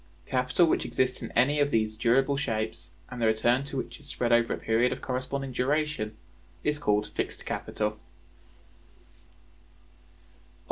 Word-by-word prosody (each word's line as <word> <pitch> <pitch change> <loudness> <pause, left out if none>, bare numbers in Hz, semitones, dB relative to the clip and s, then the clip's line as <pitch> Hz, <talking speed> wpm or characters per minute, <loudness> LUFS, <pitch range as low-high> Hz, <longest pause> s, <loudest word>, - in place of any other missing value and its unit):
Capital 130 +6 +2
which 160 - +1
exists 130 -1 0
in - - -6
any 140 +5 +3
of 145 0 +3
these 110 -4 +1
durable 130 +5 +3
shapes, 110 - -2 0.2
and 125 - -6
the 115 - +4
return 120 +4 +3
to 140 - -5
which 130 - -5
is 145 - -12
spread 120 -4 -1
over 120 0 +4
a - - 0
period 115 +3 +2
of - - -3
corresponding 130 +1 -3
duration, 130 -4 -1 0.5
is 150 0 0
called 105 -5 +1
Fixed - - -3
Capital. 105 0 -2
125 Hz, 145 wpm, -28 LUFS, 110-140 Hz, 0.5 s, the